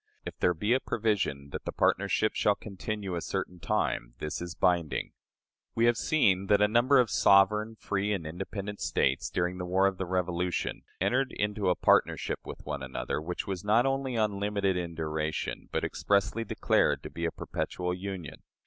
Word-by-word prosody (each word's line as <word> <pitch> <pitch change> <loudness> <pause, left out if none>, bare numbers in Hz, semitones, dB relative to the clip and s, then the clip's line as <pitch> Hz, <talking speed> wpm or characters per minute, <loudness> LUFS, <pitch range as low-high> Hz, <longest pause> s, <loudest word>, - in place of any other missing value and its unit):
If - - -6
there 90 - +2
be 105 +8 +1
a 130 - +3
provision 105 - -1
that - - -6
the - - -2
partnership 100 +3 +1
shall 105 - +2
continue 100 -1 -5
a 85 - -2
certain 90 -1 -4
time, - - -1
this 75 +2 -4
is 85 0 -6
binding." 85 -4 +1 0.6
We 115 - +3
have 120 0 +4
seen 100 -10 +2
that 100 0 +4
a 105 - +5
number 120 +6 +4
of 125 -4 +3
"sovereign, 105 +3 +4
free, 105 -1 -2
and 95 -6 -2
independent" 100 +5 -5
States, - - +1
during 90 +1 -1
the 90 - -3
war 95 +2 +3
of 95 -1 0
the 95 - -2
Revolution, 90 -1 -1 0.2
entered 125 +8 +1
into 105 -2 0
a 90 - +3
partnership - - +2
with - - -9
one 75 -2 -4
another, 65 +2 -3
which 85 +3 -4
was 95 -3 -4
not 110 +4 +4
only 135 -1 0
unlimited 100 -2 0
in 85 -2 -3
duration, 80 -1 -3
but - - -1
expressly 100 +3 +1
declared - - +1
to - - -7
be 85 - -3
a 85 - 0
"perpetual 90 +2 -3
union." 95 -3 -6
95 Hz, 180 wpm, -29 LUFS, 90-105 Hz, 0.6 s, a